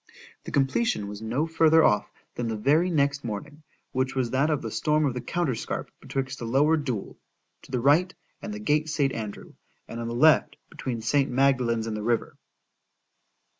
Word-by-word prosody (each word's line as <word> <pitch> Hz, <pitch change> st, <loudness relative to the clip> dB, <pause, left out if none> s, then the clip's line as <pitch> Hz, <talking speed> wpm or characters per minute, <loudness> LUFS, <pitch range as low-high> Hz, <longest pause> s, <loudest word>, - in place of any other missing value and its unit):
The -, -, -6 dB
completion 135 Hz, -, +1 dB
was 105 Hz, +1 st, -7 dB
no 120 Hz, +8 st, -1 dB
further 160 Hz, 0 st, +4 dB
off, 105 Hz, -, +3 dB, 0.2 s
than 120 Hz, -, -3 dB
the 110 Hz, -1 st, -2 dB
very 150 Hz, +11 st, +3 dB
next 140 Hz, -3 st, +1 dB
morning; 130 Hz, +8 st, -6 dB, 0.3 s
which 130 Hz, +1 st, -1 dB
was 125 Hz, -3 st, 0 dB
that 140 Hz, +4 st, +2 dB
of 150 Hz, -2 st, 0 dB
the -, -, -4 dB
storm 150 Hz, 0 st, +1 dB
of 135 Hz, -, 0 dB
the 125 Hz, -, -4 dB
counterscarp 140 Hz, -1 st, -2 dB
betwixt 135 Hz, 0 st, -4 dB
the 120 Hz, -, -5 dB
Lower 140 Hz, +7 st, +3 dB
Deule, 130 Hz, -9 st, -4 dB, 0.4 s
to -, -, -16 dB
the 125 Hz, -, 0 dB
right, 150 Hz, +9 st, +3 dB, 0.3 s
and 205 Hz, -, -6 dB
the 210 Hz, -, -5 dB
gate 155 Hz, -7 st, 0 dB
St. 145 Hz, -4 st, +1 dB
Andrew,—and 110 Hz, +1 st, -9 dB
on 115 Hz, -, -4 dB
the 115 Hz, -, -4 dB
left, 155 Hz, +5 st, +4 dB, 0.2 s
between 120 Hz, -4 st, -5 dB
St. 140 Hz, +4 st, +2 dB
Magdalen's 125 Hz, -3 st, +2 dB
and 110 Hz, -1 st, -3 dB
the 105 Hz, -, -4 dB
river. 115 Hz, +2 st, -1 dB
135 Hz, 180 wpm, -26 LUFS, 115-150 Hz, 0.4 s, further